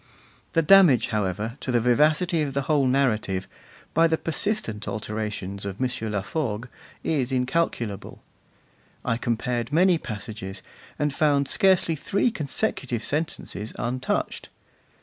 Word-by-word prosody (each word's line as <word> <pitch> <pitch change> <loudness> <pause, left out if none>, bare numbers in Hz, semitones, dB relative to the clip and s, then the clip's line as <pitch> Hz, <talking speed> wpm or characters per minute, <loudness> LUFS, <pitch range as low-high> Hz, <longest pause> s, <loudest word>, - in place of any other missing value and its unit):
The 165 - +3
damage, 160 - +6
however, 105 +2 -2
to 130 - -3
the 120 - +3
vivacity 155 +8 +3
of 140 -3 -2
the 140 - +1
whole 140 -1 +2
narrative, 110 -8 +1 0.5
by 165 0 +5
the 160 0 +1
persistent 165 - -2
alterations 105 -2 -4
of 100 0 -5
M. 130 - +2 0.2
Laforgue, 110 +2 -2 0.4
is 135 -5 0
incalculable. 125 -6 -1 0.8
I 115 - +1
compared 120 +1 -1
many 175 +2 +4
passages, 105 -5 -7 0.3
and 150 -1 0
found 145 -2 +2
scarcely 185 -2 +3
three 200 - +1
consecutive 135 - -2
sentences 145 -8 -3
untouched. 130 +2 -2
130 Hz, 120 wpm, -25 LUFS, 110-155 Hz, 0.8 s, damage